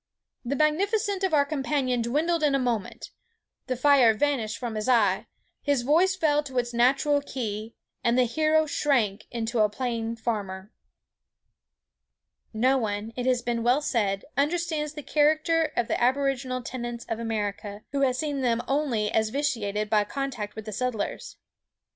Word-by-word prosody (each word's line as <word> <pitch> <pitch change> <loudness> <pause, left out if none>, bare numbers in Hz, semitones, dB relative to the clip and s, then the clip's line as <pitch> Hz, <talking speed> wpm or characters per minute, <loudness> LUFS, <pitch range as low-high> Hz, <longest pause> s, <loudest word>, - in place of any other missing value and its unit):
The 260 +3 -2
magnificence 390 - +1
of 380 - +1
our 290 -2 +4
companion 270 -4 -1
dwindled 310 +8 0
in 290 -2 +3
a - - +4
moment. 240 -5 -3 0.6
The 255 - -1
fire 255 -3 +5
vanished 225 -5 0
from 235 0 -4
his 215 +3 -2
eye; 235 -4 +3 0.3
his 285 -4 +1
voice 340 +8 +3
fell 300 -5 +2
to 265 -3 -8
its 240 0 0
natural 275 +4 +3
key; 225 -5 -5 0.3
and 235 +1 +2
the 255 - +5
hero 310 +5 +2
shrank 245 -9 0
into 235 0 -2
a 210 -1 +4
plain 230 0 -3
farmer." 205 -3 -4 1.8
No 255 +4 +2
one, 215 0 -3
it 250 0 -3
has 250 -2 +2
been 235 -1 -1
well 250 +5 +2
said, 200 -8 0
understands 310 0 0
the 300 -1 -7
character 310 +2 +2
of 240 - +1
the - - -1
aboriginal 255 -1 0
tenants 240 -1 -5
of 225 - -3
America, 210 -2 -3
who 280 -1 -1
has 255 -2 +2
seen 290 -2 -2
them 235 -2 +1
only 265 -7 0
as 220 -1 +1
vitiated 215 -6 -1
by 210 0 +3
contact 245 -3 -4
with 220 -1 -7
the 215 - -6
settlers. 250 -2 -3
250 Hz, 160 wpm, -26 LUFS, 225-290 Hz, 1.8 s, fire